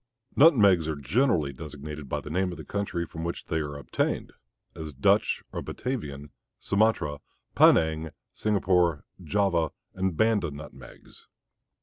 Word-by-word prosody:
Nutmegs 100 - +6
are 80 - -1
generally 75 - +1
designated 75 0 -8
by - - -2
the 75 - -8
name 90 +2 0
of 85 - -7
the - - -9
country 100 -4 -2
from 80 0 -7
which 85 0 -4
they 80 - -1
are 75 -2 -4
obtained, 70 -4 -2 0.4
as 80 -1 -7
Dutch 65 - +2
or - - -3
Batavian, 75 - -5 0.3
Sumatra, 100 -8 +1 0.3
Penang, 80 0 +4 0.2
Singapore, 90 -7 +1 0.2
Java, 85 -2 +1 0.2
and 95 -3 -2
Banda 110 -6 +2
nutmegs. 70 -3 -12
80 Hz, 130 wpm, -27 LUFS, 75-100 Hz, 0.4 s, Nutmegs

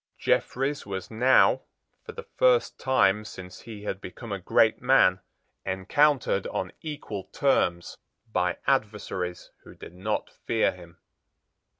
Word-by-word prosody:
Jeffreys 135 +3 0
was 95 -1 -6
now, 125 +4 +4 0.4
for - - -9
the 470 - -8
first - - +3
time 105 -6 +3
since 90 -3 -10
he 110 -3 -10
had 100 -2 -4
become 115 +4 -9
a 100 - -2
great 110 +4 +3
man, 125 -8 +4 0.4
encountered 100 +3 +1
on 90 - -3
equal 145 - -6
terms 90 -11 0 0.3
by 90 -4 0
adversaries 105 -8 -2
who - - -14
did - - -11
not 95 +4 -3 0.2
fear 115 -1 +2
him. 85 -2 -15
105 Hz, 125 wpm, -26 LUFS, 95-130 Hz, 0.4 s, now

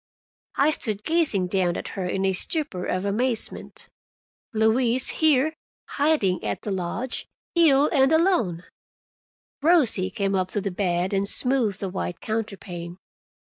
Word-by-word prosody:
I 290 +3 +3
stood 215 -8 -3
gazing 310 - +1
down 180 -2 +1
at - - -6
her 185 -2 -4
in 190 +2 -1
a 190 - +2
stupor 205 - -1
of 185 +2 -2
amazement. 230 +4 -2 0.6
Louise 230 +3 +2
here, 310 -1 +3 0.4
hiding 285 -12 +1
at - - -3
the 210 - -3
lodge, 190 +7 -3 0.3
ill 300 -4 +5
and 270 -1 +4
alone! 320 - +2 1.0
Rosie 280 - +3
came 195 +1 -2
up 185 -1 +1
to 205 - 0
the 200 0 -3
bed 180 0 -1
and 200 0 +1
smoothed 250 -7 +1
the 195 - -2
white 180 -2 -4
counterpane. 190 -6 -5
210 Hz, 140 wpm, -24 LUFS, 185-275 Hz, 1.0 s, ill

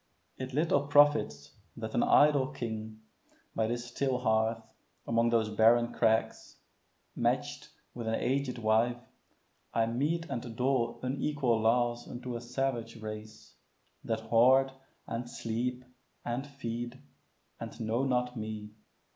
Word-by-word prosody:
It 130 0 -6
little 145 0 +1
profits 145 - +4 0.3
that - - -5
an - - +2
idle 145 -3 +5
king, 110 -3 -6 0.5
By 110 -1 +1
this 120 +1 -3
still 130 +2 -1
hearth, 110 -1 +1 0.4
among 115 0 +2
these 115 -2 +2
barren 115 +2 +4
crags, 110 -1 +1 0.6
Match'd - - -1 0.3
with 120 -2 -6
an 110 - +1
aged 130 0 -1
wife, 115 +2 +2 0.8
I 115 - +3
mete 145 +9 -1
and 120 -3 -5
dole 120 -2 0
Unequal 130 -3 0
laws 120 +1 +1
unto 120 0 -6
a 120 - -4
savage 120 -2 -3
race, 110 0 -8 0.5
That 110 -1 -2
hoard, 125 +4 +4 0.3
and 120 +1 -4
sleep, 125 +2 -3 0.4
and 125 +4 -3
feed, 120 -3 -5 0.6
and - - -8
know 115 +3 0
not 125 -1 0
me. 110 -1 -5
120 Hz, 125 wpm, -31 LUFS, 110-130 Hz, 0.8 s, idle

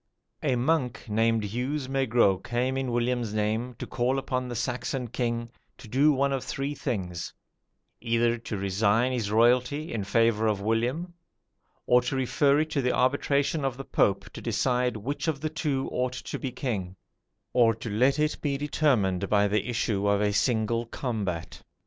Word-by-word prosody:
"A 135 -4 +1
monk 125 -1 0
named 115 +1 +2
Hugues 130 +7 -2
Maigrot 120 -8 +2
came 125 +2 -1
in 135 -2 -2
William's 120 -2 -1
name 110 +4 -1
to - - -5
call 130 +2 0
upon 130 -1 -2
the 120 - -5
Saxon 125 +1 -2
king 120 -1 -2 0.3
to - - -12
do 140 +7 +4
one 140 0 +1
of 135 - -2
three 140 +1 -3
things 95 - -4 0.6
either 115 0 +1
to 110 -2 -5
resign 100 +5 +2
his 115 -5 -1
royalty 125 +7 +2
in 110 -3 -2
favour 110 +2 +2
of 105 -2 +1
William, 120 - -1 0.7
or 125 0 +5
to 130 +3 -2
refer 140 +2 +2
it 155 0 -3
to 140 - +1
the 125 -1 +1
arbitration 140 +3 +1
of 135 -2 -1
the 135 - -7
Pope 100 0 +1
to - - -8
decide 125 +1 0
which 140 +10 -4
of 155 -4 0
the 155 +2 -2
two 145 -4 -1
ought 125 0 -1
to 125 - -6
be 130 - -3
king, 105 -8 -3 0.6
or 115 -3 +4
to 115 +1 -8
let 125 +7 +3
it 150 0 +1
be 140 -2 0
determined 115 - +1
by 105 -1 +4
the 105 +3 0
issue 105 -3 0
of 100 0 +3
a 105 0 +1
single 115 +1 +1
combat. 100 -10 -4
120 Hz, 175 wpm, -27 LUFS, 110-135 Hz, 0.7 s, or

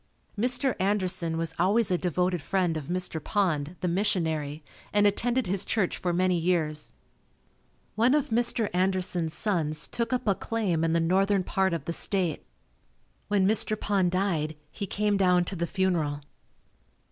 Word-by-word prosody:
Mr. 250 +4 +1
Anderson 185 -4 0
was 165 0 -2
always 200 +3 +3
a - - +4
devoted 180 -1 0
friend 180 -2 0
of 155 -3 -4
Mr. 180 -3 -3
Pond, 170 -6 0
the 180 - 0
missionary 160 -6 -1 0.3
and 205 0 +3
attended 240 +4 +1
his 190 +1 -1
church 205 -5 0
for 180 - -2
many 180 +1 +2
years. 160 -3 0 1.0
One 235 +7 +3
of 295 -1 0
Mr. 235 -1 +1
Anderson's 180 -3 0
sons 160 -7 -1
took 235 +1 -3
up 255 - -1
a 200 - +5
claim 190 -6 -1
in 165 0 +1
the 170 - +3
northern 190 +3 +2
part 190 0 +1
of 170 - -3
the 170 - -2
State. 180 -4 -1 0.8
When 195 -2 +2
Mr. 215 0 +1
Pond 195 -3 +1
died, 175 -5 -1 0.2
he 200 - -5
came 205 +1 0
down 180 -2 +3
to 190 - -5
the 170 -1 -2
funeral. 165 -6 0
185 Hz, 160 wpm, -27 LUFS, 165-205 Hz, 1.0 s, a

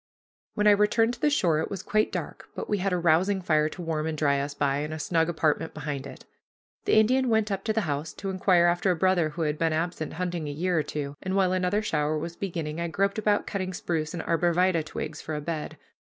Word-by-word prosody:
When 210 - +1
I 210 - +8
returned 210 +3 +3
to 240 - -9
the 300 - +4
shore 175 - +2
it 160 - -2
was 195 - -5
quite 215 0 +1
dark, - - -5
but - - -5
we 205 - 0
had 195 +1 0
a 180 - +1
rousing 175 +4 +3
fire 155 -4 +2
to 175 - -8
warm 160 -1 -2
and 160 -1 -3
dry 140 -2 +2
us 145 +1 -3
by, 140 -1 +1
and 150 +2 -3
a - - -5
snug 165 +1 +1
apartment 160 -1 0
behind 145 -2 -4
it. - - -12 0.6
The - - +3
Indian 255 +4 +4
went 220 -2 +2
up 195 0 -2
to 220 - +1
the 220 +1 +1
house 150 -3 -3
to 195 -1 -4
inquire 185 -2 +3
after 175 +2 +2
a 180 - +3
brother 175 -2 +2
who 165 +2 -3
had 150 -1 -1
been 165 -1 +2
absent 160 0 -2
hunting 175 -3 -3
a - - -3
year 175 +5 -1
or 160 - +3
two, 145 -1 -5
and 185 +1 -2
while 190 -2 +3
another 185 +3 +1
shower 155 -5 0
was 165 +2 -5
beginning, 170 -4 -4
I 170 - -1
groped 195 +5 0
about 210 -1 +1
cutting 185 -2 -3
spruce 160 -2 -2
and 165 - -4
arbor 170 0 +1
vitæ 180 -2 +3
twigs 155 -1 -5
for 155 - -4
a - - -2
bed. 155 0 -4
170 Hz, 250 wpm, -27 LUFS, 155-195 Hz, 0.6 s, I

